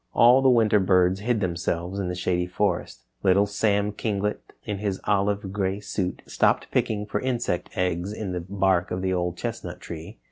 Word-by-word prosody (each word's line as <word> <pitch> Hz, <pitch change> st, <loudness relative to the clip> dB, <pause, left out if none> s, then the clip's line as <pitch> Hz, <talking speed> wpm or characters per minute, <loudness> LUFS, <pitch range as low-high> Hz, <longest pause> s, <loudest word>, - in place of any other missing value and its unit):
All 125 Hz, +3 st, +7 dB
the 135 Hz, -, +5 dB
winter 110 Hz, -4 st, +4 dB
birds 95 Hz, 0 st, +3 dB
hid 110 Hz, +1 st, 0 dB
themselves 90 Hz, +1 st, -2 dB
in 95 Hz, -, -2 dB
the 90 Hz, -, -3 dB
Shady 90 Hz, 0 st, 0 dB
Forest. 90 Hz, -10 st, -2 dB, 0.2 s
Little 100 Hz, +1 st, +4 dB
Sam 105 Hz, 0 st, +1 dB
Kinglet, 105 Hz, -1 st, -2 dB, 0.2 s
in 105 Hz, -2 st, -4 dB
his 100 Hz, -2 st, -2 dB
olive 100 Hz, -1 st, 0 dB
gray 100 Hz, -1 st, -1 dB
suit, 95 Hz, -3 st, -3 dB
stopped -, -, +1 dB
picking 105 Hz, -1 st, 0 dB
for 105 Hz, -, -2 dB
insect 120 Hz, -8 st, -1 dB
eggs 90 Hz, +1 st, -1 dB
in 105 Hz, -3 st, -4 dB
the 90 Hz, -1 st, -3 dB
bark 95 Hz, -1 st, +1 dB
of 90 Hz, +1 st, -3 dB
the 95 Hz, 0 st, +1 dB
Old 90 Hz, -1 st, -1 dB
Chestnut 90 Hz, -7 st, -5 dB
Tree. 80 Hz, -3 st, -8 dB
95 Hz, 180 wpm, -25 LUFS, 90-105 Hz, 0.2 s, All